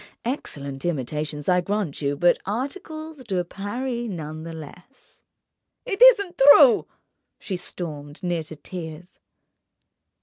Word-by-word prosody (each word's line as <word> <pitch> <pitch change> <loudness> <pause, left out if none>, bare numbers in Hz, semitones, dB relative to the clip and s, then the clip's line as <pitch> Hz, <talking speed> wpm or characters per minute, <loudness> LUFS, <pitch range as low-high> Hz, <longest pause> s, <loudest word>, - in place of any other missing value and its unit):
Excellent 140 - -4
imitations, 150 -1 -3
I 180 -1 +4
grant 195 -6 -2
you, 140 0 -1
but 175 +3 +4
articles 310 - -5
de 190 -6 -1
Paris 235 +6 -4
none 155 -4 -6
the 165 +1 -7
less." 175 - -13 0.6
"It 435 -3 -3
isn't 405 -8 +6 0.2
true!" 265 -7 +6 0.5
she 195 - -5
stormed, 150 -4 -7
near 175 -2 0
to 160 0 -9
tears. 165 +1 -9
180 Hz, 115 wpm, -24 LUFS, 155-250 Hz, 0.6 s, isn't